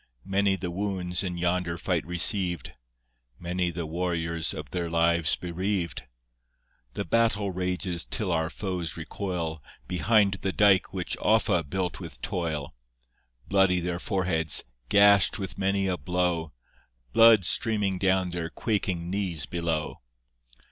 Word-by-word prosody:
Many 95 0 +2
the 90 -1 -5
wounds 90 -2 -2
in 90 -2 -4
yonder 85 0 -1
fight 85 0 -1
receiv'd! 90 - +2 0.7
Many 90 +1 -2
the 85 -1 -5
warriors 85 -1 -2
of - - -8
their 85 -2 -3
lives 85 -1 +2
bereaved! 90 -2 -3 0.9
The - - -3
battle 105 0 +1
rages 90 -1 -1
till 105 -6 -1
our 80 -1 0
foes 90 -5 -4
recoil 85 -2 -4 0.3
Behind 100 0 +2
the 95 - -1
Dike 95 -2 +3
which 95 -2 -3
Offa 105 -5 +2
built 90 +3 -3
with 80 -8 -9
toil. 85 -7 -3 0.7
Bloody 95 -2 +3
their 85 0 -3
foreheads, 85 - +2 0.3
gash'd 100 0 +5
with 95 -2 -6
many 95 0 +1
a 95 -2 -1
blow, 90 -3 -1 0.6
Blood 115 -4 +7
streaming 100 -1 0
down 95 -1 +1
their 85 -1 -4
quaking 95 -3 -2
knees 95 -6 -1
below. 85 -3 -3
90 Hz, 125 wpm, -27 LUFS, 85-95 Hz, 0.9 s, Blood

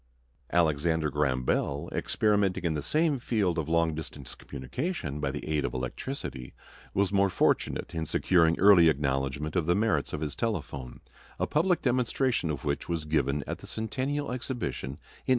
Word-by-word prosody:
Alexander 80 -1 +2
Graham 70 -4 +1
Bell, 70 +6 0
experimenting 100 -4 +1
in 85 -2 +1
the 75 - -2
same 150 - +1
field 100 -8 0
of 80 -1 -3
long 85 -1 +2
distance 75 -4 -6
communication 75 - -4
by - - 0
the - - -5
aid 75 -2 0
of - - -2
electricity, 65 - -5 0.4
was 100 0 +2
more 100 0 +4
fortunate 90 -1 +1
in 80 -2 -2
securing 85 -1 +3
early 95 -4 +7
acknowledgment 70 +1 -1
of 85 -3 +1
the 85 - +4
merits 100 -9 +1
of 75 - -4
his 75 -2 -3
telephone, 70 - -3 0.4
a - - +1
public 170 +4 +1
demonstration 125 - +1
of 70 -3 -3
which 70 +3 -2
was 85 -3 -1
given 75 -2 +1
at - - -4
the - - -11
Centennial 130 +6 -2
Exhibition 125 - -3
in 70 +2 -6
1876. - - -15
80 Hz, 170 wpm, -29 LUFS, 75-110 Hz, 0.4 s, early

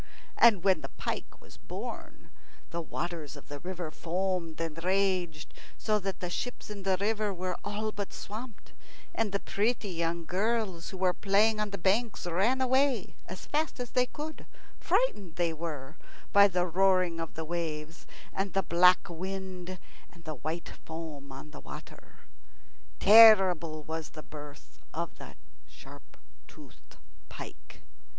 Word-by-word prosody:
And 215 -7 +6
when 190 -5 +4
the 135 - -6
pike - - -5
was - - -15
born - - -8 0.4
the 170 - -2
waters 165 -2 -4
of 145 - -13
the 145 0 -6
river 175 -2 -5
foamed 175 -1 -2
and 165 0 -4
raged, 185 -4 0 0.2
so 215 -1 +1
that 195 -1 -4
the 180 - -2
ships 245 +1 -4
in 205 -1 -6
the 190 -1 +2
river 210 +1 0
were 185 -1 -3
all 215 +1 -2
but 205 -2 -5
swamped, 225 +2 -8 0.4
and 225 -2 0
the 200 - 0
pretty 215 +1 0
young 170 0 -1
girls 195 -1 0
who 190 - -7
were 185 -1 +3
playing 210 +3 +3
on 210 -1 0
the 200 - -4
banks 205 +5 +1
ran 200 +10 +2
away 260 -4 +2
as 185 +1 -7
fast 305 -2 -1
as 245 -1 -4
they 250 0 +3
could, 310 +4 -7 0.3
frightened, 335 - +1
they 170 -2 +1
were, 155 -5 -6 0.4
by 200 0 +9
the 180 -2 +1
roaring 185 -1 +3
of 165 -1 -5
the 160 - -4
waves, 160 -1 -4 0.3
and 195 -1 -2
the 195 - +2
black 180 +2 +5
wind 185 +1 -5 0.3
and 170 -1 -17
the 155 - -4
white 160 +3 -3
foam 155 -4 -7
on 135 +3 -9
the - - -9
water. - - -11 0.8
Terrible 190 -8 +8
was 160 +1 -4
the 155 - -10
birth 150 -1 -11 0.2
of - - -4
the - - -10 0.3
sharp - - -14 0.3
toothed - - -16 0.3
pike. - - -10
185 Hz, 155 wpm, -30 LUFS, 165-205 Hz, 0.8 s, by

